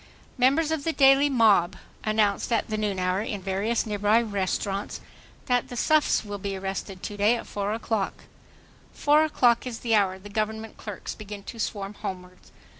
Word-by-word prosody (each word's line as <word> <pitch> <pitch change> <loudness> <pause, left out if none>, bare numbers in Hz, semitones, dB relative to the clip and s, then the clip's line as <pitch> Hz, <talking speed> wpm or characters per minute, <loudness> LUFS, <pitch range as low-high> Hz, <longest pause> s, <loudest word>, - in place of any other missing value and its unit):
Members 280 +5 +3
of 320 -3 -1
the 325 - 0
daily 275 0 +5
mob 215 -9 +4 0.3
announced 215 0 +1
at 230 -1 +1
the 215 - -1
noon 210 -2 -1
hour 185 +1 0
in 210 -2 -4
various 195 +5 -1
nearby 210 +1 +2
restaurants 200 -2 -2 0.5
that 245 -1 +1
"the 245 - -8
suffs 305 -4 +2
will 205 -1 -5
be 195 0 -4
arrested 190 0 -5
to 205 - -5
day 210 +4 +4
at - - -6
4 205 0 -3
o'clock." 220 -2 -2 0.7
Four 300 +1 +4
o'clock 250 -6 +2
is 235 -2 -6
the 230 -2 0
hour 195 -3 +3
the 190 +2 -12
Government 220 +1 -3
clerks 210 -3 -7
begin 205 -1 -9
to 230 - -9
swarm 200 -2 -3
homewards. 180 -2 -8
215 Hz, 175 wpm, -26 LUFS, 200-235 Hz, 0.7 s, daily